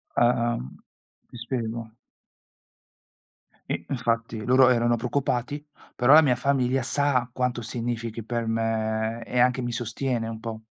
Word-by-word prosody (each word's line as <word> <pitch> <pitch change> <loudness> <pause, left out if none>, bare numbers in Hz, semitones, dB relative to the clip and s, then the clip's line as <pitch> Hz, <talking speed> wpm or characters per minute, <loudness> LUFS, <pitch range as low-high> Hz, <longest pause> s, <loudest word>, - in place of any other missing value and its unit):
Ah-ah. 120 -1 +2
Mh, 65 +2 -8 0.5
ti 120 - -11
spiego. 115 -2 -4 1.8
I - - -3
infatti 115 -4 -2
loro 130 +1 +5
erano 120 -1 +3
preoccupati, 130 +3 -2 0.3
però 125 +2 +3
la 160 - +10
mia 130 -5 +3
famiglia 130 0 +1
sa 130 -1 +1
quanto 125 -1 -1
significhi 115 0 -4
per 115 0 -2
me 110 0 -1
e 125 - -1
anche 125 +1 +3
mi 120 0 -3
sostiene 120 0 -2
un 110 -1 -6
po'. 110 -1 -6
120 Hz, 135 wpm, -25 LUFS, 115-125 Hz, 1.8 s, la